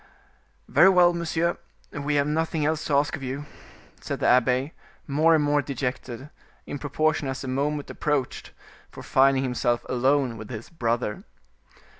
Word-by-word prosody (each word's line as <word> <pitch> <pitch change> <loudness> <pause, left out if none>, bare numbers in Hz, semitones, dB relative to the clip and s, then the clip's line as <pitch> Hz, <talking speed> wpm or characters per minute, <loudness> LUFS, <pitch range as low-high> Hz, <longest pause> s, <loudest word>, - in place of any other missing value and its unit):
"Very 190 - +6
well, 180 -2 +5
monsieur, 170 0 -1 0.3
we 145 0 -2
have 140 -1 +3
nothing 160 +1 -1
else 155 0 0
to 145 - +1
ask 145 +4 +2
of 155 - -10
you," 135 +2 -5 0.6
said - - -4
the - - -1
abbe, 125 +4 +3 0.3
more 155 +3 +3
and 155 - +2
more 145 0 +2
dejected, 130 0 -5 0.3
in 145 - -6
proportion 155 0 0
as 135 0 -4
the - - -6
moment 145 +3 -1
approached 145 -4 -2 0.4
for - - -11
finding 135 0 +3
himself 125 -2 -1
alone 130 -1 +1
with 110 - -9
his 115 +2 -8
brother. 115 -7 -2
140 Hz, 155 wpm, -25 LUFS, 130-155 Hz, 0.6 s, Very